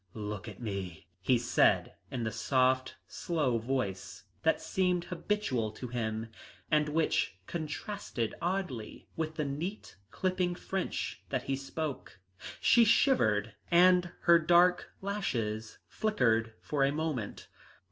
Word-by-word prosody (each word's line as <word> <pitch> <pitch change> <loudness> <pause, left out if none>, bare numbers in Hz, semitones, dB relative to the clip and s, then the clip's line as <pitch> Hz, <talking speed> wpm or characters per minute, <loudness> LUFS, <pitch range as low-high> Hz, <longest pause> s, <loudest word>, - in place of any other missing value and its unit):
"Look 105 0 -5
at 105 -3 -9
me," 100 -8 -5 0.2
he 125 +7 +3
said 120 +1 +3 0.2
in 120 -2 -3
the 110 - -1
soft 130 +3 +1
slow 145 -9 -1
voice 100 -7 -3 0.2
that 160 - +2
seemed 180 -2 0
habitual 175 - -1
to 125 +2 -7
him, 115 -2 -3 0.4
and 150 -1 +3
which 155 -10 +1
contrasted 160 - -4
oddly 175 - -3
with 160 -1 -3
the 150 - -1
neat, 160 - -5
clipping 185 - 0
French 190 +1 -3
that 130 -2 -1
he 135 - -1
spoke. 140 -1 -5 0.4
She 235 - +6
shivered 110 - +3 0.2
and 180 0 +5
her 170 -1 +6
dark 175 +2 +4
lashes 115 - -2
flickered 115 - +1
for 145 -2 0
a 135 - +3
moment. 150 -8 -3
135 Hz, 125 wpm, -31 LUFS, 115-175 Hz, 0.4 s, She